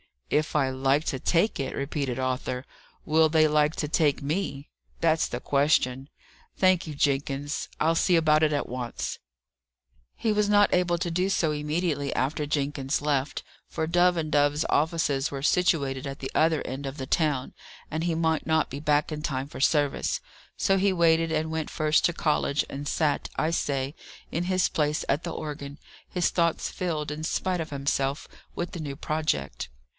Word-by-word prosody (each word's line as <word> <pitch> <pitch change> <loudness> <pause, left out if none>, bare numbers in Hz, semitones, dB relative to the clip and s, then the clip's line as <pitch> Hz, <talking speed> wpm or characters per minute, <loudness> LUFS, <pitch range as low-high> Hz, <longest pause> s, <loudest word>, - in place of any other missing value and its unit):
"If 155 +1 +1
I 135 -3 +3
like 135 +3 +1
to 130 - -1
take 175 - +1
it!" 135 -1 -3
repeated 140 -2 -2
Arthur. 130 0 -2 0.4
"Will 160 +1 +4
they 155 0 +4
like 150 +1 +2
to 150 - -2
take 150 -2 +1
me? 145 -2 -3 0.3
That's 160 -1 +3
the 120 - -5
question. 140 -2 +1 0.5
Thank 185 -3 +3
you, 150 - -6
Jenkins; 140 +1 -1
I'll 165 +2 +2
see 175 +2 +3
about 155 -2 +4
it 155 -1 +3
at 145 - -1
once." 125 -1 -4 1.0
He 225 - 0
was 210 -1 +2
not 205 0 +4
able 180 -1 +2
to 170 0 -2
do 180 +3 +1
so 165 -5 +1
immediately 150 -1 -1
after 145 +3 0
Jenkins 140 -2 -1
left; 145 -2 -1 0.2
for 160 - -2
Dove 175 +2 +3
and 155 -2 -2
Dove's 145 +1 +2
offices 150 -3 +1
were 140 -1 -5
situated 140 -6 +1
at 135 0 -6
the 135 - -5
other 160 -1 +2
end 135 +2 -5
of 135 +2 -6
the 135 - -4
town, 145 -3 0 0.4
and 160 +2 -2
he 170 -2 0
might 160 -2 0
not 160 -1 +2
be 140 - -6
back 150 +1 +1
in 150 0 -4
time 135 -2 -2
for - - -9
service. 145 - +1 0.4
So 195 -1 +2
he 195 0 +2
waited 165 -2 +3
and 160 0 -1
went 160 -1 -2
first 155 0 +2
to 175 - +2
college, 150 -2 +1
and 140 +1 -6
sat, 150 -2 0
I 160 - 0
say, 140 -4 -1 0.4
in 170 +2 -1
his 185 0 +2
place 150 0 0
at 145 +4 +1
the 170 - -4
organ, 145 -2 -6 0.3
his 180 -1 +1
thoughts 170 -2 0
filled, 155 -5 -3
in 150 +1 -5
spite 180 +2 -1
of 160 - -5
himself, 140 0 -1 0.3
with 175 - -3
the 175 - -6
new 145 -3 -5
project. 155 - -2
150 Hz, 180 wpm, -27 LUFS, 140-165 Hz, 1.0 s, Will